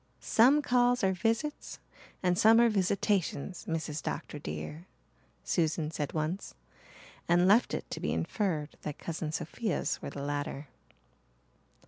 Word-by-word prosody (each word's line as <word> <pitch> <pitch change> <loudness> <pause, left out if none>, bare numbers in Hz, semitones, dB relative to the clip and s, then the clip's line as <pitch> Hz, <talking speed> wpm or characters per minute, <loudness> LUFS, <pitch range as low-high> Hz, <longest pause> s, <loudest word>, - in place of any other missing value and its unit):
"Some 270 +6 +4
calls 245 -2 +3
are 190 0 +3
visits 225 - -2 0.5
and 180 -1 +3
some 225 +5 +6
are 235 0 +6
visitations, 195 -4 0
Mrs. 160 -2 -3
Dr. - - -5
dear," 80 - -6 0.6
Susan 160 -2 0
said 150 -3 -3
once, 160 +5 -3 0.7
and 175 +1 +5
left 215 +5 +4
it - - -5
to - - -4
be - - -1
inferred 160 -9 -2
that 150 - -5
Cousin 160 -2 -4
Sophia's 185 +6 -2
were - - -5
the 140 - -6
latter. 145 0 -3
175 Hz, 130 wpm, -30 LUFS, 155-220 Hz, 0.7 s, some